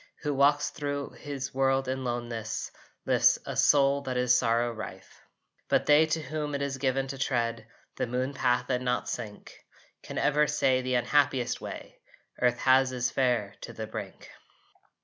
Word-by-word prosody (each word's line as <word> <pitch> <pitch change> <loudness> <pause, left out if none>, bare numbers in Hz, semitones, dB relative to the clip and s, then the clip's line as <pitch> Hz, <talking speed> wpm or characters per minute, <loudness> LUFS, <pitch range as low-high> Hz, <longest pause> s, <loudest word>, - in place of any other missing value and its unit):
Who 150 -1 0
walks 145 +2 +3
thro 145 -1 -4
his 140 -2 -6
world 135 0 +1
in 130 0 -2
loneness 120 -3 -4 0.3
lifts - - +4
A - - -5
soul 140 -1 +4
that 130 -2 -3
is 125 0 +4
sorrow 120 -1 +1
rife. 100 -4 -9 0.5
But - - +2
they 150 +2 +5
to 155 0 -1
whom 150 -1 -3
it 140 - -3
is 135 -1 -3
given 135 0 0
to 135 0 -6
tread 115 -4 -1 0.3
The - - -1
moon 130 +3 -2
path 125 -2 +1
and 125 0 0
not 125 0 -1
sink 110 -4 -6 0.5
Can - - -8
ever 150 +1 +3
say 135 -3 +2
the 130 0 -1
unhappiest 130 -1 +1
way - - -8 0.4
Earth 125 -1 +3
has 130 0 +4
is 125 -1 -1
fair, 120 -6 0
to - - -8
the 110 - -5
brink. 110 -3 -8
130 Hz, 170 wpm, -28 LUFS, 120-140 Hz, 0.5 s, they